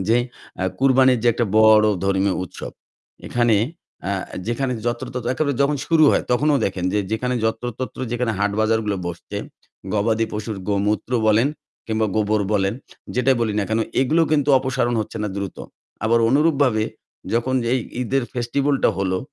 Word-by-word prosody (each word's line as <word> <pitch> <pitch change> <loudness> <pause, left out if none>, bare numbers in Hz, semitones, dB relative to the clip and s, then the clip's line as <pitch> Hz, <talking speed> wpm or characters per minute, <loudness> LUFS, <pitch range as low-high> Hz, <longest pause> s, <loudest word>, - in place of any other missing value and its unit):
যে 115 - +5 0.4
আ - - 0 0.2
কুরবানির 130 -1 +4
যে 120 - +4
একটা 120 - 0
বড় 110 -1 +6 0.2
ধর্মীয় 95 0 +1
উৎসব, 90 - -9 0.5
এখানে 120 -3 +2 0.5
আ - - 0 0.4
যেখানে 125 +3 -1
যত্রতত্র 120 0 -3
একেবারে 145 -1 0
যখন 145 +1 +1
শুরু 160 -2 +4
হয় - - +2
তখনও 145 +4 +3
দেখেন 90 -2 -2
যে 105 - +1
যেখানে 125 +3 -1
যত্র 110 +1 -1
তত্র 130 - -5
যেখানে 120 -2 0
হাট 105 0 +1
বাজারগুলো 110 -2 +1
বসছে, 85 -1 -6 0.6
গবাদি 110 +2 +1
পশুর 105 0 -4
গোমূত্র 105 +3 0
বলেন 110 +6 +4 0.4
কিংবা 110 -1 0
গোবর 105 0 +1
বলেন 100 0 +1 0.4
যেটাই 125 +1 +3
বলি 110 -2 0
না 105 - +1
কেন 110 +1 +1 0.2
এগুলো 155 +6 +3
কিন্তু 145 -2 +2
অপসারণ 130 -2 -1
হচ্ছে 105 - -6
না 105 - -1
দ্রুত। 100 -1 -4 0.5
আবার 115 +1 +3
অনুরূপভাবে 140 -5 +3 0.5
যখন 120 +3 0 0.2
এই 130 - +3 0.2
ঈদের 135 +2 0
ফেস্টিভাল 135 +4 0
টা - - +6
হলো, 95 -1 0
115 Hz, 160 wpm, -21 LUFS, 105-130 Hz, 0.6 s, বড়